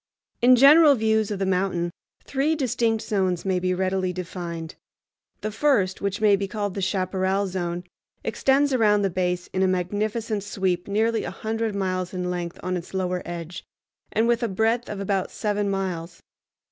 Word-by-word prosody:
In 250 +1 +7
general 290 +3 +7
views 220 -2 +1
of 205 - -2
the 195 - -1
mountain 180 -2 0 0.3
three 280 +4 0
distinct 230 -5 0
zones 185 -4 0
may 190 -1 +1
be 185 0 0
readily 185 0 0
defined. 170 -2 -6 0.7
The 215 - -3
first, 215 -6 +1
which 200 0 -2
may 210 -2 +5
be 200 0 -2
called 205 -2 -3
the 195 - -4
Chaparral 190 +1 0
Zone, 175 -2 -3 0.4
extends 275 +1 +2
around 210 -4 +3
the 195 - +1
base 180 0 -1
in 185 - 0
a 190 - +4
magnificent 210 +4 -1
sweep 190 -3 -2
nearly 220 +2 +1
a - - -3
hundred 220 +3 -3
miles 185 -2 -2
in 180 0 -2
length 175 -1 -4
on 185 0 -1
its 175 +2 -8
lower 180 -1 -1
edge, 170 0 -6 0.5
and 225 +2 +2
with 235 -1 +2
a 235 - +1
breadth 225 +4 0
of 205 - -5
about 195 -1 -1
seven 205 -2 -1
miles. 180 -3 -4
195 Hz, 170 wpm, -24 LUFS, 180-220 Hz, 0.7 s, In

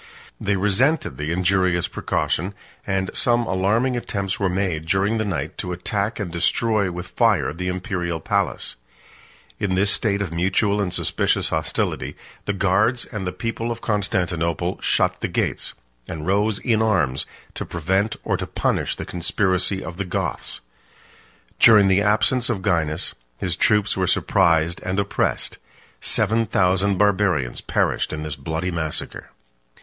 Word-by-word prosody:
They 100 0 0
resented 105 - +1
the 75 +2 -3
injurious 90 -1 +2
precaution; 95 +5 -1 0.3
and 95 0 0
some 120 -1 +2
alarming 110 +7 +1
attempts 100 -5 -3
were 100 -2 +1
made, 90 -4 -1
during 100 +5 +1
the 110 - 0
night, 95 -6 -3
to 90 - -3
attack 100 +5 -2
and 95 -5 -3
destroy 100 +3 +1
with 90 +1 -5
fire 70 - +2
the 90 +3 -4
Imperial 90 -3 -2
palace. - - -1 0.8
36 100 - -1
In 95 - +1
this 100 +2 +3
state 100 -2 +2
of 85 -4 -6
mutual 95 +4 +1
and 95 -3 -1
suspicious 90 - 0
hostility, - - -1 0.3
the 100 - 0
guards 105 +6 +2
and 100 -5 -5
the - - -1
people 115 +2 -3
of 115 0 -5
Constantinople 90 -6 -1
shut - - +2
the - - 0
gates, - - -2 0.3
and 75 -1 -6
rose 100 +3 +2
in 110 -2 +1
arms 75 -12 +1 0.3
to - - -4
prevent 95 +6 0
or - - 0
to - - -4
punish - - 0
the - - -6
conspiracy 95 +2 +1
of 85 +2 -7
the 100 - -1
Goths. - - -3 1.0
During 105 -3 +7
the 95 +1 +4
absence 110 +4 +2
of 100 -6 -2
Gainas, 85 -3 +1 0.2
his - - -1
troops 105 -1 +2
were 95 -1 0
surprised 85 -3 +2
and 95 +2 -1
oppressed; 100 0 -1 0.4
seven 115 0 +2
thousand 95 0 +2
Barbarians 95 -10 +1
perished - - 0
in 75 0 -4
this 75 -2 -4
bloody 80 +4 -3
massacre. 80 -3 -4
95 Hz, 150 wpm, -22 LUFS, 85-105 Hz, 1.0 s, During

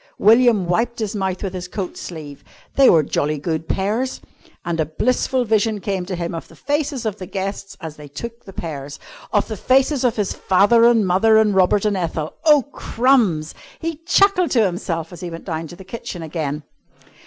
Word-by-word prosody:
William 225 -2 +5
wiped 230 +7 0
his 215 -1 -3
mouth 190 -2 -2
with 195 -2 -3
his 180 -1 -5
coat 185 0 -5
sleeve. 150 -5 -8 0.3
They 275 -1 +7
were 160 -2 +5
jolly 150 +1 -1
good 160 +1 -3
pears. 220 +7 -1 0.5
And 170 -1 -2
a 160 - +2
blissful 250 - 0
vision 220 -1 +1
came 190 -2 -3
to 185 - -3
him 170 -1 -4
of 165 - -6
the - - -17
faces 285 -3 -2
of 215 -2 -2
the 185 - -8
guests 195 +1 -5
as 160 -4 -8
they 150 -1 -10
took 235 +12 -8
the 195 - -10
pears, 145 -5 -6 0.3
of 205 -1 +1
the 220 - -4
faces 265 +4 +2
of 245 -3 +2
his 205 -3 -1
father 205 +5 +4
and 235 -3 +5
mother 195 +5 +4
and 215 -2 +4
Robert 190 +2 +3
and 210 -1 +1
Ethel. 165 -4 -3
Oh, 300 -3 +6
crumbs! 225 - +1 0.2
He 330 -1 -4
chuckled 360 +2 +3
to 230 -4 +3
himself 175 -2 -3
as 175 - -10
he 180 - -4
went 165 0 -9
down 165 -2 -4
to 175 - -11
the 190 +1 -13
kitchen 185 -4 -7
again. 150 -2 -3
195 Hz, 200 wpm, -20 LUFS, 170-235 Hz, 0.5 s, They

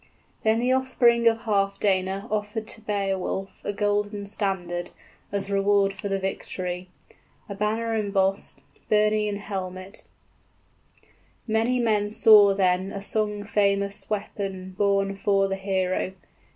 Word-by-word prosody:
} - - -38
Then 220 0 +3
the 245 +2 +1
offspring 245 -3 +3
of 225 0 +3
Healfdene 195 -1 0
offered 215 +1 -2
to 220 - -4
Beowulf 195 -2 -2
30 - - -5
A - - -1
golden 205 0 -1
standard, 190 -4 -2 0.4
as 200 0 -2
reward 200 0 +3
for 200 0 -5
the 195 - 0
victory, 185 -1 -4 0.6
A 200 - -5
banner 220 +3 -1
embossed, 195 -2 0 0.3
burnie 210 0 +3
and 200 - -3
helmet; 190 -1 -6 1.4
Many 225 +3 +1
men 210 -3 +1
saw 210 -2 +7
then 185 0 +1
a 195 - -6
song 210 0 -1
famous 200 -1 0
weapon 195 -3 -4
Borne 195 0 +1
'fore 195 0 +2
the 195 - -2
hero. 190 -1 -1
200 Hz, 130 wpm, -25 LUFS, 195-210 Hz, 1.4 s, saw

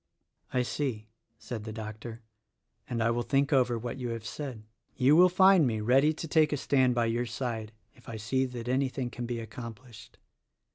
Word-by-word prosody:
"I 125 -1 +1
see," 120 -5 -3 0.3
said 115 -2 -6
the 110 - -6
doctor, 110 +1 -8 0.7
"and 115 -2 -1
I 115 - +2
will 120 +1 0
think 140 +3 +1
over 125 -3 +3
what 120 +3 -5
you 125 -1 -3
have 115 -1 -5
said. 110 0 -6 0.3
You 135 +4 +4
will 180 +2 +7
find 190 -3 +5
me 110 -2 -1
ready 130 +7 +4
to 160 +1 -6
take 155 -1 +3
a 150 - 0
stand 130 -2 +2
by 120 -1 +2
your 120 +2 -1
side 115 -3 -4 0.2
if - - -16
I 115 - -5
see 130 +5 0
that 125 -2 -7
anything 130 -1 -1
can 120 -1 -5
be 120 -1 -3
accomplished. 115 0 -10
120 Hz, 190 wpm, -29 LUFS, 115-135 Hz, 0.7 s, will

